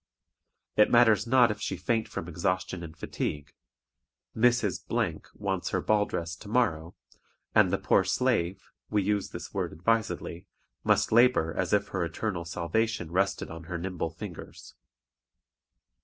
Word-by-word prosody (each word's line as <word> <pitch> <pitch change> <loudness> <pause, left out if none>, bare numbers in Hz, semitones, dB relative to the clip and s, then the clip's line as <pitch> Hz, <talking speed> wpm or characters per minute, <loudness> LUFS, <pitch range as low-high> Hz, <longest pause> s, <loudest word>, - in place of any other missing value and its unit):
It 105 - +6
matters 120 -2 +5
not 125 -2 +5
if 105 0 -6
she - - -2
faint 115 -2 0
from 85 - -6
exhaustion 90 +1 -2
and 80 -1 -9
fatigue; 75 -2 -4 0.8
Mrs. 120 -4 +2 0.6
wants 95 -3 -2
her - - 0
ball 105 -1 +2
dress 85 0 -4
to 105 - -12
morrow, 90 -9 0 0.6
and - - +5
the - - +2
poor - - +3
slave 95 -3 0 0.2
(we 105 -2 +1
use 100 0 0
this - - -8
word - - -2
advisedly) 95 -1 -1 0.4
must - - +2
labor 120 -8 +4
as 95 -1 -1
if 100 0 +2
her 95 -2 -1
eternal 85 +1 -3
salvation 90 +2 -1
rested 95 -1 0
on 80 0 -8
her 85 0 -4
nimble 90 -1 -3
fingers. 85 +1 -10
95 Hz, 140 wpm, -28 LUFS, 85-110 Hz, 0.8 s, It